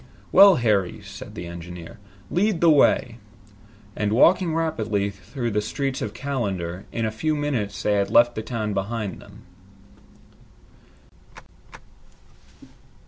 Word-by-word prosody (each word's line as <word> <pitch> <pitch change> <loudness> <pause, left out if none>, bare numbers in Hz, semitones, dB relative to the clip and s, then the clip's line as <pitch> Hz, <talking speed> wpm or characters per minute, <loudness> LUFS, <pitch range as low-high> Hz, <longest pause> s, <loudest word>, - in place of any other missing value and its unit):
"Well, 195 -1 +8
Harry," 105 - 0
said - - -10
the 85 - -6
engineer, 85 +5 -9 0.3
"lead 200 0 +1
the 170 -1 +5
way." 120 -5 +3 0.8
And 105 -1 -1
walking 170 - +4
rapidly 110 -11 -1
through 115 +6 -5
the 105 0 0
streets 135 +5 -3
of 105 - -4
Callander, 100 -10 -3
in 115 -1 -2
a 110 - -1
few 155 +8 -1
minutes 130 -9 -2
they 105 - +2
had 100 -1 +1
left 120 0 +5
the 110 - -4
town 110 -2 -3
behind 100 +1 -3
them. - - -15
110 Hz, 125 wpm, -23 LUFS, 100-140 Hz, 0.8 s, Well